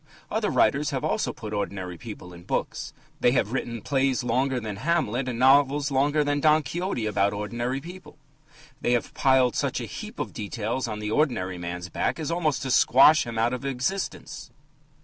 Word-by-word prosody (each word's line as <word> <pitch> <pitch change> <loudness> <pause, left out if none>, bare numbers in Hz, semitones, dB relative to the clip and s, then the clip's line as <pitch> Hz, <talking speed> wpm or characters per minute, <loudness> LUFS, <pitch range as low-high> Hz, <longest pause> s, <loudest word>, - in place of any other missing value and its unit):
Other - - 0
writers - - +2
have - - -3
also - - 0
put 105 0 -8
ordinary 95 -3 -3
people 90 -2 -9
into 85 0 -14
books. - - -2 0.3
They 120 - +3
have 115 -4 +1
written 120 -3 -3
plays 135 -2 +1
longer 130 +2 +1
than 110 -4 -5
Hamlet, 130 -3 0
and 120 - -4
novels 140 +3 +4
longer 145 +3 +2
than 145 0 0
Don 155 +1 +4
Quixote, 170 - -3
about 100 -1 +1
ordinary 120 +5 -3
people. 180 +5 -11 0.6
They 120 - +1
have 120 - -1
piled 130 -3 +3
such - - -1
a - - -4
heap - - -8
of - - -4
details 110 +4 -3
on 110 -2 -4
the 105 0 -3
ordinary 100 - 0
man's 90 +1 -5
back - - -1
as 160 0 -3
almost 160 -5 0
to 130 - -2
squash 135 +3 +6
him 115 -1 -5
out 115 +2 +2
of 125 - -4
existence. 135 +9 -3
125 Hz, 185 wpm, -26 LUFS, 105-145 Hz, 0.6 s, squash